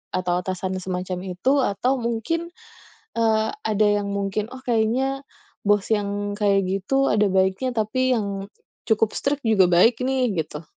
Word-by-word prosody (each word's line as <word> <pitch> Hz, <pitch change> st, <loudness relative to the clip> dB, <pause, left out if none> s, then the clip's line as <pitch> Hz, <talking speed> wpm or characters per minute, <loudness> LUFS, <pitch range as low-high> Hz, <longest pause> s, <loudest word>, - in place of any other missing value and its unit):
atau 180 Hz, -1 st, 0 dB
atasan 185 Hz, 0 st, -3 dB
semacam 180 Hz, 0 st, -4 dB, 0.2 s
itu, 270 Hz, +9 st, +2 dB
atau 250 Hz, +4 st, 0 dB
mungkin, 235 Hz, +9 st, -2 dB, 0.7 s
eee, 220 Hz, -1 st, +1 dB
ada 215 Hz, -1 st, +1 dB
yang 200 Hz, -, -4 dB
mungkin, 200 Hz, +2 st, -2 dB
oh, 260 Hz, +1 st, -11 dB
kayaknya 250 Hz, +4 st, +1 dB, 0.5 s
bos 205 Hz, -1 st, +3 dB
yang 205 Hz, -1 st, -1 dB
kayak 200 Hz, -1 st, +2 dB
gitu 195 Hz, +9 st, +1 dB
ada 210 Hz, -1 st, +3 dB
baiknya, 190 Hz, +6 st, +1 dB
tapi 250 Hz, +4 st, +1 dB
yang, 200 Hz, -2 st, -3 dB, 0.4 s
cukup 220 Hz, 0 st, +2 dB
strict 280 Hz, 0 st, -2 dB
juga 205 Hz, -5 st, +4 dB
baik, 205 Hz, +8 st, +4 dB
nih, 255 Hz, -2 st, +1 dB
gitu. 160 Hz, -3 st, -4 dB
210 Hz, 145 wpm, -23 LUFS, 190-245 Hz, 0.7 s, juga